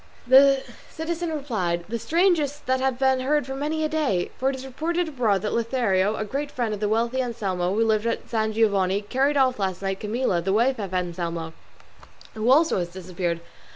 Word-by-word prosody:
The 270 Hz, +1 st, +6 dB, 0.3 s
citizen 330 Hz, +1 st, -3 dB
replied, 215 Hz, -, -2 dB
"The 230 Hz, +3 st, -3 dB
strangest 305 Hz, -, +1 dB
that 260 Hz, 0 st, +1 dB
have 265 Hz, -1 st, 0 dB
been 265 Hz, 0 st, +2 dB
heard 290 Hz, +2 st, +1 dB
for 265 Hz, -, -5 dB
many 300 Hz, +3 st, -2 dB
a -, -, +2 dB
day; 300 Hz, -, 0 dB
for 265 Hz, -, +2 dB
it 270 Hz, -, -2 dB
is 265 Hz, 0 st, -8 dB
reported 330 Hz, +6 st, -2 dB
abroad 220 Hz, -, 0 dB
that 210 Hz, -, -1 dB
Lothario, 220 Hz, -4 st, +1 dB
the 215 Hz, -, -2 dB
great 280 Hz, +6 st, -3 dB
friend 240 Hz, -5 st, -2 dB
of 210 Hz, -, -4 dB
the 210 Hz, 0 st, 0 dB
wealthy 235 Hz, +4 st, +1 dB
Anselmo, 195 Hz, -7 st, -2 dB
who 225 Hz, +1 st, +2 dB
lived 220 Hz, 0 st, +1 dB
at 230 Hz, -, -2 dB
San 220 Hz, -1 st, 0 dB
Giovanni, 200 Hz, -3 st, +2 dB
carried 270 Hz, +7 st, +1 dB
off 255 Hz, -3 st, +2 dB
last 190 Hz, -1 st, -2 dB
night 195 Hz, 0 st, -2 dB
Camilla, 210 Hz, -4 st, 0 dB
the 190 Hz, +3 st, 0 dB
wife 240 Hz, +4 st, +2 dB
of 195 Hz, -3 st, -4 dB
Anselmo, 170 Hz, -2 st, -3 dB, 0.8 s
who 220 Hz, +2 st, -1 dB
also 305 Hz, -, +4 dB
has 175 Hz, -, -2 dB
disappeared. 175 Hz, -1 st, -4 dB
230 Hz, 195 wpm, -24 LUFS, 195-270 Hz, 0.8 s, The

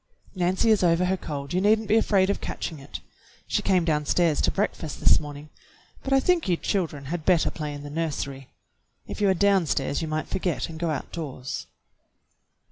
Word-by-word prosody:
"Nancy 185 Hz, +4 st, +2 dB
is 210 Hz, -3 st, +3 dB
over 170 Hz, +1 st, +3 dB
her 185 Hz, +1 st, +1 dB
cold, 145 Hz, -4 st, -6 dB
you 185 Hz, -, +1 dB
need 215 Hz, +2 st, +4 dB
n't 220 Hz, -, -7 dB
be 215 Hz, -, +3 dB
afraid 200 Hz, -3 st, +3 dB
of -, -, -4 dB
catching 160 Hz, -3 st, -5 dB
it. 140 Hz, +1 st, -8 dB, 0.4 s
She -, -, 0 dB
came 185 Hz, -3 st, +2 dB
downstairs 155 Hz, +1 st, +2 dB
to -, -, +3 dB
breakfast 175 Hz, -6 st, -2 dB
this -, -, +5 dB
morning, 145 Hz, 0 st, -9 dB, 0.5 s
but 270 Hz, -, -5 dB
I 270 Hz, -, +6 dB
think 340 Hz, -, +1 dB
you 175 Hz, -, +2 dB
children 160 Hz, -9 st, -2 dB
had 175 Hz, -3 st, -3 dB
better 175 Hz, -2 st, +3 dB
play 150 Hz, -2 st, -5 dB
in 145 Hz, 0 st, -7 dB
the 145 Hz, -, -8 dB
nursery. 140 Hz, -4 st, -3 dB, 0.6 s
If -, -, -7 dB
you 200 Hz, -, +4 dB
are 190 Hz, -, +3 dB
downstairs 190 Hz, -6 st, +2 dB
you 160 Hz, -, -3 dB
might 155 Hz, 0 st, -2 dB
forget 180 Hz, -3 st, -2 dB
and 160 Hz, -1 st, -8 dB
go 170 Hz, -1 st, -1 dB
outdoors." 140 Hz, -3 st, -5 dB
170 Hz, 195 wpm, -25 LUFS, 150-190 Hz, 0.6 s, I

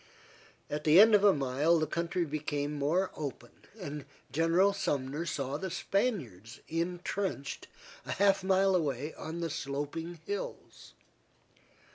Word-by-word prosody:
At 150 Hz, +1 st, -4 dB
the 155 Hz, +4 st, +7 dB
end 220 Hz, +2 st, +8 dB
of 205 Hz, -1 st, +6 dB
a 205 Hz, -, +8 dB
mile 145 Hz, +3 st, +2 dB
the 155 Hz, -, +1 dB
country 170 Hz, +3 st, -1 dB
became 150 Hz, -1 st, -2 dB
more 155 Hz, +7 st, +1 dB
open, 135 Hz, -5 st, -6 dB, 0.3 s
and 150 Hz, -6 st, -6 dB, 0.3 s
General 165 Hz, +6 st, +3 dB
Sumner 145 Hz, -3 st, -2 dB
saw 140 Hz, -2 st, -2 dB
the 190 Hz, +4 st, -4 dB
Spaniards 175 Hz, -, -2 dB
intrenched 175 Hz, -1 st, -3 dB, 0.4 s
a -, -, -1 dB
half 195 Hz, -1 st, +3 dB
mile 190 Hz, 0 st, +3 dB
away 150 Hz, -3 st, -1 dB
on 165 Hz, +2 st, -6 dB
the 165 Hz, -, -1 dB
sloping 150 Hz, +3 st, -4 dB
hills. 205 Hz, 0 st, -6 dB
165 Hz, 130 wpm, -31 LUFS, 145-185 Hz, 0.4 s, end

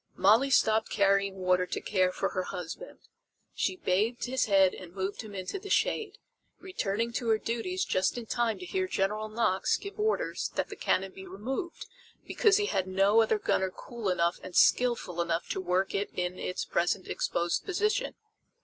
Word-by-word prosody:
Molly 225 Hz, +8 st, +4 dB
stopped 220 Hz, -4 st, +3 dB
carrying 200 Hz, -1 st, +2 dB
water 180 Hz, -1 st, +1 dB
to -, -, -3 dB
care 185 Hz, -2 st, +1 dB
for -, -, -1 dB
her 185 Hz, -, -2 dB
husband. 180 Hz, -, -7 dB, 0.5 s
She -, -, -1 dB
bathed 225 Hz, -, 0 dB
his 260 Hz, +1 st, 0 dB
head 195 Hz, -3 st, +4 dB
and 180 Hz, -1 st, -11 dB
moved 195 Hz, +3 st, -3 dB
him 215 Hz, -3 st, -10 dB
into 190 Hz, -, -4 dB
the 400 Hz, -, -9 dB
shade, 425 Hz, 0 st, 0 dB, 0.4 s
returning 230 Hz, -, -2 dB
to 235 Hz, -, -2 dB
her 220 Hz, -, +4 dB
duties 300 Hz, -, -2 dB
just 185 Hz, +5 st, 0 dB
in 240 Hz, -, -5 dB
time 230 Hz, -1 st, 0 dB
to 365 Hz, -, -8 dB
hear 375 Hz, 0 st, -1 dB
General 215 Hz, -, -1 dB
Knox 215 Hz, -4 st, +1 dB
give 400 Hz, +1 st, -9 dB
orders 440 Hz, +4 st, 0 dB
that -, -, -1 dB
the -, -, -7 dB
cannon 190 Hz, 0 st, 0 dB
be 190 Hz, 0 st, -11 dB
removed, 260 Hz, -, -5 dB, 0.4 s
because 420 Hz, -2 st, +3 dB
he 415 Hz, -, +1 dB
had 190 Hz, -, -1 dB
no 195 Hz, +4 st, +4 dB
other 220 Hz, -1 st, +2 dB
gunner 190 Hz, -2 st, 0 dB
cool 230 Hz, +2 st, -5 dB
enough 170 Hz, -1 st, +1 dB
and 185 Hz, -, -9 dB
skilful 235 Hz, -8 st, +3 dB
enough 170 Hz, 0 st, -1 dB
to -, -, -2 dB
work 185 Hz, +1 st, 0 dB
it 200 Hz, +1 st, -1 dB
in 180 Hz, 0 st, -2 dB
its 180 Hz, -, -3 dB
present 175 Hz, +2 st, 0 dB
exposed 170 Hz, 0 st, -1 dB
position. 425 Hz, +6 st, 0 dB
205 Hz, 180 wpm, -29 LUFS, 185-250 Hz, 0.5 s, Molly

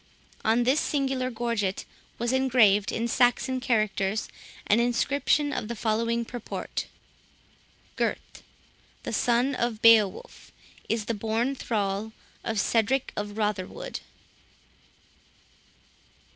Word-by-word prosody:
On 230 Hz, +2 st, +3 dB
this 260 Hz, +5 st, +3 dB
singular 270 Hz, -3 st, -1 dB
gorget 230 Hz, -5 st, -2 dB, 0.3 s
was 240 Hz, +2 st, -1 dB
engraved, 235 Hz, -6 st, +4 dB
in 230 Hz, +1 st, -1 dB
Saxon 245 Hz, +2 st, +2 dB
characters, 215 Hz, -4 st, 0 dB, 0.4 s
an 210 Hz, -, +3 dB
inscription 280 Hz, +4 st, +1 dB
of -, -, -3 dB
the 235 Hz, -, -4 dB
following 230 Hz, +2 st, 0 dB
purport:—"Gurth, 240 Hz, -1 st, -7 dB, 0.9 s
the -, -, -4 dB
son 245 Hz, +3 st, +2 dB
of 240 Hz, -3 st, -1 dB
Beowulph, 220 Hz, -4 st, +4 dB, 0.4 s
is 220 Hz, -2 st, 0 dB
the 230 Hz, -, -1 dB
born 225 Hz, +5 st, -1 dB
thrall 210 Hz, -3 st, -2 dB, 0.3 s
of 225 Hz, -2 st, -1 dB
Cedric 235 Hz, +6 st, +1 dB
of 205 Hz, 0 st, -5 dB
Rotherwood." 210 Hz, -4 st, -3 dB
230 Hz, 100 wpm, -27 LUFS, 215-250 Hz, 0.9 s, engraved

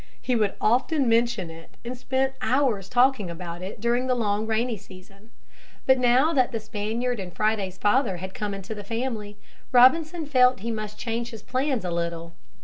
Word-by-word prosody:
He 250 Hz, -, -1 dB
would 210 Hz, -3 st, +1 dB
often 260 Hz, +5 st, +2 dB
mention 230 Hz, -6 st, +1 dB
it 165 Hz, 0 st, -14 dB
and 245 Hz, +2 st, -4 dB
spent 265 Hz, +1 st, -1 dB
hours 250 Hz, -8 st, +1 dB
talking 245 Hz, -6 st, +3 dB
about 170 Hz, 0 st, -7 dB
it 190 Hz, +4 st, -7 dB
during 240 Hz, +3 st, +1 dB
the 255 Hz, -, +2 dB
long 215 Hz, -2 st, 0 dB
rainy 225 Hz, +2 st, 0 dB
season. 195 Hz, +1 st, -15 dB, 0.6 s
But 260 Hz, -1 st, +5 dB
now 255 Hz, +6 st, +4 dB
that 255 Hz, -3 st, +2 dB
the 230 Hz, -, -2 dB
Spaniard 220 Hz, +3 st, -3 dB
and 185 Hz, -2 st, -6 dB
Friday's 200 Hz, -2 st, -1 dB
father 210 Hz, -1 st, +2 dB
had 190 Hz, +2 st, -7 dB
come 205 Hz, -1 st, -3 dB
into 195 Hz, +2 st, -6 dB
the 205 Hz, -1 st, -7 dB
family, 225 Hz, -2 st, -4 dB, 0.3 s
Robinson 310 Hz, +7 st, +5 dB
felt 255 Hz, -4 st, +4 dB
he 230 Hz, +2 st, -3 dB
must 215 Hz, -1 st, -5 dB
change 235 Hz, +1 st, -3 dB
his 225 Hz, -4 st, -10 dB
plans 260 Hz, -4 st, -1 dB
a 175 Hz, -, -2 dB
little. 170 Hz, 0 st, -3 dB
225 Hz, 180 wpm, -25 LUFS, 200-255 Hz, 0.6 s, But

